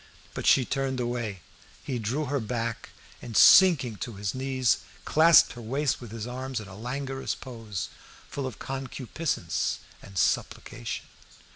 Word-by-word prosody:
But - - -3
she 130 - +6
turned 135 0 -1
away; 120 -6 -3 0.4
he 125 -3 -3
drew 125 +8 -1
her 140 +1 -1
back, 115 0 -3 0.3
and, 115 -3 -4
sinking 140 - +7
on 115 - -8
his 100 -1 -2
knees, 130 -2 +1 0.3
clasped 165 +2 +6
her 120 - -9
waist 135 +6 -1
with 120 - -8
his 110 0 -6
arms 130 +1 -4
in 110 - -9
a 95 - -11
languorous 130 0 -3
pose, 115 -7 -6 0.4
full 140 -2 -4
of 125 - -7
concupiscence 135 +3 -2 0.2
and 100 -1 -11
supplication. - - -1
125 Hz, 145 wpm, -27 LUFS, 115-135 Hz, 0.4 s, sinking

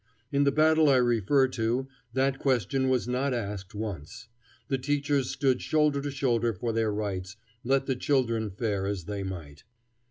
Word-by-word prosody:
In 140 0 +2
the 140 - +4
battle 155 +1 +4
I 135 - +5
refer 125 +2 +3
to 120 +2 -1 0.3
that 135 +1 +1
question 130 0 +1
was 130 -2 +1
not 130 +2 0
asked 100 -4 -5
once. 105 +1 -6 0.4
The 135 -2 -1
teachers 145 -1 0
stood 130 -2 +1
shoulder 150 -2 +2
to 145 - -3
shoulder 120 -4 +1
for 115 +5 -2
their 110 -1 +1
rights, 100 -2 -4 0.3
let 135 +2 +2
the 135 - 0
children 115 -5 0
fare 100 -1 -2
as 100 -3 -3
they 100 +3 -4
might. 85 -7 -7
125 Hz, 165 wpm, -28 LUFS, 105-135 Hz, 0.4 s, I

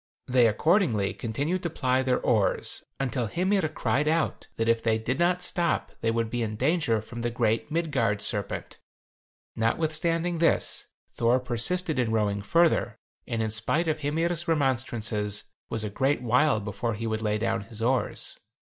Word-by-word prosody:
They 125 -2 +4
accordingly 115 - +2
continued 145 +11 -2
to 170 - -2
ply 130 -4 +1
their 130 -1 +1
oars, 110 -5 +1 0.2
until 125 -3 -1
Hymir 185 - +1
cried 135 +5 0
out 160 +1 0
that 115 - -1
if 115 0 +3
they 110 -1 +2
did 120 +6 -2
not 180 +1 +2
stop 170 -2 0
they 115 - +1
would 115 -1 -1
be 120 0 -1
in 110 -2 -2
danger 130 -4 +1
from 115 +1 -8
the 120 - 0
great 115 +2 0
Midgard 140 -11 0
serpent. - - -1 0.8
Notwithstanding 165 +7 0
this, 165 - +1 0.2
Thor 120 +2 +2
persisted 130 +6 0
in 120 -3 +1
rowing 105 -2 0
further, 165 +10 +2 0.3
and 115 -1 -1
in 110 - -2
spite 130 +10 +1
of 155 -1 0
Hymir's 165 +3 -1
remonstrances 120 -8 0 0.3
was 110 - 0
a 105 - -2
great 135 +2 0
while 125 +1 +3
before 105 +2 -3
he 115 +2 -5
would 110 0 -2
lay 105 -1 0
down 115 0 -1
his 110 +2 -9
oars. 125 +3 0
125 Hz, 165 wpm, -27 LUFS, 110-155 Hz, 0.8 s, They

